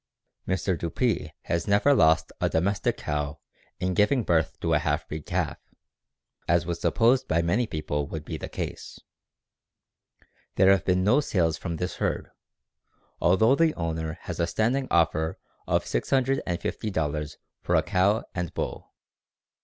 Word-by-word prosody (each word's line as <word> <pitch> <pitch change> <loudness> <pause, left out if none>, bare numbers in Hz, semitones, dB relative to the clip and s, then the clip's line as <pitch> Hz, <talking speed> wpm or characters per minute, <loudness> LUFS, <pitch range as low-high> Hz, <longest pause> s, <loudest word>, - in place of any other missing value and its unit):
"Mr. 95 0 0
Dupree 85 0 -1
has 85 - -2
never 105 +8 +4
lost 80 - +4
a - - +2
[domestic] 95 +5 0
cow 75 0 -3 0.4
in 90 +1 0
giving 110 +6 +3
birth 80 -4 +1
to 80 -1 0
a 75 - +4
half 75 -1 -1
breed 75 -1 -7
calf, - - -1 0.9
as 85 0 +2
was 85 0 -4
supposed 120 +3 +3
by 80 - +2
many 105 +8 +1
people 75 -4 -3
would 80 0 -6
be - - -5
the - - -6
case. - - -6 1.6
There 95 0 +6
have 95 -3 +2
been 90 0 +2
no 115 +9 +4
sales 85 - +1
from 85 - -4
this 90 +3 -4
herd, - - -2 0.9
although 95 +8 +4
the 160 +2 +3
owner 80 -1 -3
has 90 - -6
a 85 - +1
standing 125 +8 0
offer 80 -1 +1 0.3
of - - +1
$650 85 - -1 0.2
for - - 0
a - - +4
cow 100 +3 +2
and 90 -3 -3
bull. - - -4
85 Hz, 145 wpm, -26 LUFS, 80-105 Hz, 1.6 s, There